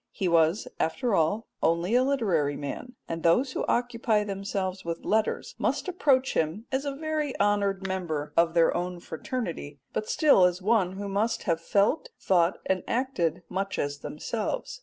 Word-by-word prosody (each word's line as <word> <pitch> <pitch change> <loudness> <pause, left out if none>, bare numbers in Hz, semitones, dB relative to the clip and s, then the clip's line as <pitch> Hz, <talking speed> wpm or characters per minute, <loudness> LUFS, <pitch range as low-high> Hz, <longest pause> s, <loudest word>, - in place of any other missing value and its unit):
He 195 - -2
was 170 +3 +3
after 230 +8 0
all 190 +6 +1 0.2
only 170 +5 +1
a 250 - +5
literary 195 - +1
man, 250 - -6
and 165 0 -4
those 240 +12 +3
who - - -2
occupy 230 -3 +1
themselves 195 -1 -3
with 170 0 -5
letters 220 +1 0
must - - 0
approach 275 -8 +2
him 165 +8 -1
as 270 +2 -1
a 280 -1 -2
very 305 -2 -2
honoured 200 -1 +1
member 170 -6 -3
of 170 0 +3
their 165 -1 +4
own 180 0 -3
fraternity, 165 - -5
but 215 - -3
still 295 - +5
as 180 0 +1
one 195 -2 +2
who 200 +1 -5
must 205 +4 0
have 165 -3 0
felt, 205 - +1
thought, 175 -1 +2
and 190 -1 +1
acted 180 - -1
much 195 +2 -3
as 145 0 -2
themselves. 370 - -4
195 Hz, 165 wpm, -27 LUFS, 170-240 Hz, 0.2 s, a